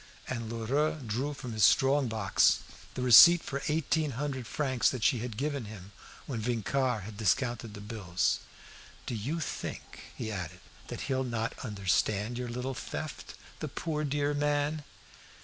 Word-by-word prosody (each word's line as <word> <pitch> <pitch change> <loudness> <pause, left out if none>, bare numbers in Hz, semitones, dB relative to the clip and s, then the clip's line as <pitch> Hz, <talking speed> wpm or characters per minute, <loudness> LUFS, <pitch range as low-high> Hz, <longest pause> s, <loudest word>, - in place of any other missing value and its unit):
And 115 -3 -4
Lheureux 135 +7 0
drew 130 +7 -2
from 125 -4 -6
his 110 -2 +1
strong 135 +8 +5
box 110 -4 +3 0.3
the 125 - -2
receipt 160 +8 +9
for 140 0 -4
eighteen 155 -1 0
hundred 135 -4 -3
francs 130 -5 +1
that 125 -4 -4
she 120 - +3
had 115 -2 -5
given 140 -3 -2
him 100 -2 -10 0.3
when 120 -5 -4
Vincart 120 0 0
had 105 +1 -9
discounted 115 +1 0
the 105 - -8
bills. 100 -5 -1 0.7
"Do - - -3
you 130 +10 -2
think," 155 - -6
he 110 - -4
added, 90 -3 -5 0.3
"that - - -6
he'll 130 -1 -1
not 115 -3 -2
understand 105 +1 0
your 125 -1 -3
little 125 +3 -3
theft, - - -6 0.2
the - - -3
poor 155 -2 -3
dear 145 0 0
man?" 145 +1 0
125 Hz, 155 wpm, -30 LUFS, 110-145 Hz, 0.7 s, receipt